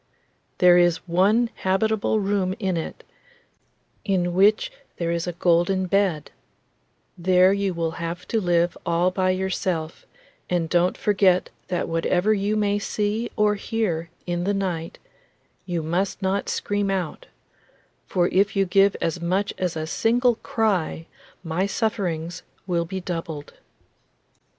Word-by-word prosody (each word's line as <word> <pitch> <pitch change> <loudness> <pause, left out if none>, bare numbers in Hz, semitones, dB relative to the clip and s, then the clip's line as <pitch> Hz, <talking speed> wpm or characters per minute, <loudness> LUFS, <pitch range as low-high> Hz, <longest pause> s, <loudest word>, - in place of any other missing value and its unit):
There 180 -1 +6
is 175 0 +2
one 205 +7 +3
habitable 215 +3 +1
room 195 -2 0
in 190 -5 -1
it, 165 - -5 1.0
in 180 -3 0
which 210 - +3 0.3
there 170 -1 -1
is 170 +1 -2
a - - -1
golden 175 +2 +2
bed; 185 -5 0 0.8
there 185 +1 +4
you 200 -2 -1
will 165 -1 -1
have 170 +1 -5
to 225 - +1
live 175 -1 +2
all 170 +2 +1
by 185 0 0
yourself, 185 -3 -2 0.4
and 175 -2 0
don't 175 +2 +2
forget 190 -3 +2 0.2
that 180 -2 -2
whatever 175 +5 +1
you 205 +1 0
may 205 -1 +1
see 210 +3 -2
or 210 -1 +3
hear 200 -6 -2 0.2
in 175 0 -2
the 200 +2 0
night 175 -4 -3 0.7
you 170 -3 -2
must 180 +5 -1
not 195 0 -1
scream 205 -1 -1
out, 185 -5 -3 0.8
for 175 -1 +1
if 200 +2 +2
you 195 0 +3
give 195 +2 +4
as 170 +1 -1
much 185 +4 0
as 180 -3 -1
a 155 0 -3
single 240 +8 +2
cry 190 -7 -1 0.4
my 175 +3 -1
sufferings 180 -6 -2 0.2
will 170 -2 0
be 190 +3 -4
doubled. 165 -4 -5
185 Hz, 135 wpm, -24 LUFS, 170-200 Hz, 1.0 s, There